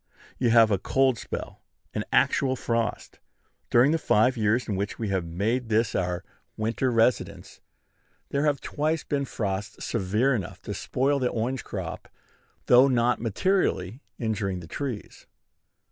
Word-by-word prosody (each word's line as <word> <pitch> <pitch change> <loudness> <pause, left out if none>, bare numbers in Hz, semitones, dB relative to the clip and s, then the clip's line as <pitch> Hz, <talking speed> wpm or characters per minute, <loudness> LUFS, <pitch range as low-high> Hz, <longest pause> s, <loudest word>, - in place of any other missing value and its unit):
You 125 - +2
have 115 -1 +6
a 100 - +2
cold 130 +2 +2
spell, - - -6 0.3
an - - -2
actual 130 -1 +3
frost. 115 -3 -2 0.5
During 125 +5 +5
the 165 - +1
five 125 0 +3
years 110 +2 +1
in 105 - -1
which 100 +2 -3
we 110 -3 -3
have 95 -2 0
made 110 +9 -1
this 110 0 +2
our 90 -1 -1 0.3
winter 115 +4 0
residence, 115 -1 0 0.7
there 140 +2 0
have 145 -2 +1
twice 155 +1 -1
been 140 -1 -1
frosts 105 -3 -4
severe 110 +5 +1
enough 100 -8 -4
to - - -4
spoil 140 +2 0
the 125 -2 +1
orange 120 +2 -2
crop, - - -6 0.6
though 125 +2 +7
not 120 -3 +2
materially 115 - 0 0.2
injuring 105 -5 -2
the 85 - -9
trees. 125 - -6
115 Hz, 145 wpm, -26 LUFS, 105-130 Hz, 0.7 s, though